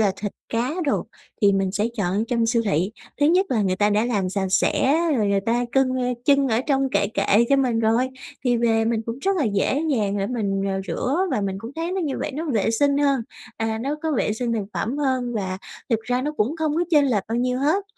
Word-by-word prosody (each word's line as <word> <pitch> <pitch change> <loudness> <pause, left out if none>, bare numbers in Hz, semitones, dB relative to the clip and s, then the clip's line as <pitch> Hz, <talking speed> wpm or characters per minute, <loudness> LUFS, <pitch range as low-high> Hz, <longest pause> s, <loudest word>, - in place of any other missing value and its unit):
là 200 -3 +3
thịt 205 +1 -4 0.2
cá 235 +3 -1
đồ 285 - 0 0.4
thì 200 -1 +6
mình 195 -1 0
sẽ 205 +2 0
chọn 200 +1 0
trong 235 -2 +1
siêu 230 0 +2
thị. 190 0 0 0.3
Thứ 290 - +5
nhất 365 +5 +3
là 225 -5 +2
người 185 -1 0
ta 205 +2 +2
đã 210 +2 +2
làm 205 -6 0
sạch 190 +1 -1
sẽ 265 +8 +2 0.2
rồi 215 -3 +1
người 200 0 +2
ta 235 +4 0
cưng 270 -1 +3 0.4
trưng 280 -1 +4
ở 225 0 +2
trong 270 -2 +2
kệ 200 - +2
kệ 200 +3 +3
cho 275 - +4
mình 250 -4 +1
rồi, 230 +3 +2 0.4
thì 245 -2 +3
về 225 -1 +2
mình 225 -1 0
cũng 230 +3 -4
rất 390 +6 0
là 310 - +1
dễ 215 +7 +1
dàng 205 -7 0
để 195 - -1
mình, 200 -5 -1
ờ, 195 -1 -1
rửa, 245 - -1
và - - 0
mình 195 -1 -2
cũng 225 +4 -8
thấy 335 +2 -2
nó 380 - -1
như 295 -6 -2
vậy - - -3
nó 310 +4 -3
vệ 225 -1 +1
sinh 280 +5 +2
hơn, 280 -3 +2 0.4
à, 220 0 -2
nó 280 +3 -2
có 320 -1 0
vệ 215 - +1
sinh 235 +2 -2
thực 220 -3 -1
phẩm 255 +7 -2
hơn 260 -4 0
và 190 -3 -3 0.3
thực 225 -2 +2
ra 245 +2 -1
nó 300 +2 -2
cũng 250 +10 0
không 315 -2 0
có 340 +2 +1
chênh 295 -4 +5
lệch 215 -7 +1
bao 225 - -1
nhiêu 250 +1 0
hết. 310 +9 +1
230 Hz, 250 wpm, -23 LUFS, 205-275 Hz, 0.4 s, thì